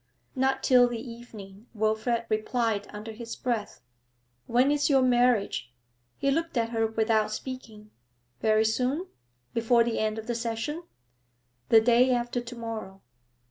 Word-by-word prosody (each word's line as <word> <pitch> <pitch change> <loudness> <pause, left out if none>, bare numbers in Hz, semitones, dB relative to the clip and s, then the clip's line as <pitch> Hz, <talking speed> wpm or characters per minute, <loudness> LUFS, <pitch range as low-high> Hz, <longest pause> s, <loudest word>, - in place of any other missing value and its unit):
'Not 265 0 +1
till 250 -1 +6
the 240 -1 -4
evening,' 225 -3 -11
Wilfrid 220 +2 0
replied 215 -1 -1
under 210 +2 -7
his 230 +1 -7
breath. 235 -4 -3 0.7
'When 250 +4 +3
is 295 0 +2
your 270 -2 +4
marriage?' 240 - +2 0.5
He 275 0 +1
looked 330 -1 -1
at 230 -1 +1
her 225 -1 +1
without 220 -1 +1
speaking. 215 -3 -7 0.5
'Very 215 +4 +3
soon? 255 +10 0 0.5
Before 235 +1 +3
the 230 -1 -1
end 215 0 0
of 220 - -6
the 240 - -2
session?' 230 +7 -3 0.9
'The 225 - +7
day 240 +2 +4
after 240 0 -2
to 240 +1 -9
morrow.' 225 -4 -6
230 Hz, 140 wpm, -27 LUFS, 220-250 Hz, 0.9 s, The